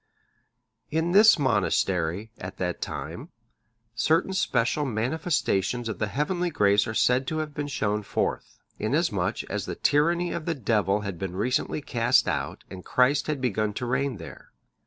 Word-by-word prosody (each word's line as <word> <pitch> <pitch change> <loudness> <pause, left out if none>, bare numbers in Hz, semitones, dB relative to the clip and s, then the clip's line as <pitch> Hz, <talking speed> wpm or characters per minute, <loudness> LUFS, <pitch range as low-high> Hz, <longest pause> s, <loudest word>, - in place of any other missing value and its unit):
] 115 -1 -52
In 170 +2 0
this 210 +2 +7
monastery, 100 - 0
at 95 +1 -7
that 90 -1 -3
time, - - -5 0.6
certain 160 +10 +1
special 130 -4 +1
manifestations 125 - -1
of 110 - -4
the 110 - 0
heavenly 175 - -1
grace 100 -8 +3
are 110 - -4
said 125 +3 +2
to 155 - -2
have 155 -1 -3
been 145 0 -3
shown 105 -6 -1
forth; 100 - -3 0.2
in - - 0
as - - +2
much - - -2
as - - -4
the - - -4
tyranny 170 +4 +2
of 155 - -4
the 165 - -1
Devil 105 -5 +1
had 100 -5 -5
been 95 -2 -4
recently 125 +8 -1
cast 120 -1 +2
out - - -3
and 90 -1 -10
Christ 130 +3 +2
had 150 -2 -1
begun 110 -4 0
to 125 - -3
reign 130 0 -1
there. 85 - -11
125 Hz, 170 wpm, -26 LUFS, 105-150 Hz, 0.6 s, this